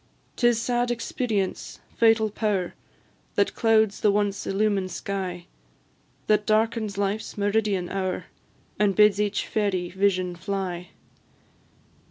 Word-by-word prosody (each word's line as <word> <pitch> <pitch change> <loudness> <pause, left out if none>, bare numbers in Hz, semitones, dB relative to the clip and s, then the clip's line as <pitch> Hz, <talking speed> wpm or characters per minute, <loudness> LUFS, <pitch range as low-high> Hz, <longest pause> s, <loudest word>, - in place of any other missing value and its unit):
'Tis 240 -2 +3
sad 240 +1 0
Experience, 230 -4 -2 0.2
fatal 225 -2 +4
power! 200 -4 -1 0.6
That - - +2
clouds 220 -3 +2
the 210 - +4
once 205 -1 -1
illumined 195 -1 +1
sky, 185 -1 -4 0.8
That 210 -1 +2
darkens 215 -1 +1
life's 205 +2 -2
meridian 205 -3 +1
hour, 185 0 -3 0.5
And 205 -2 +3
bids 210 -1 +5
each 205 -1 -1
fairy 190 -5 -1
vision 185 -2 +1
fly. 180 -1 -4
205 Hz, 110 wpm, -25 LUFS, 190-220 Hz, 0.8 s, bids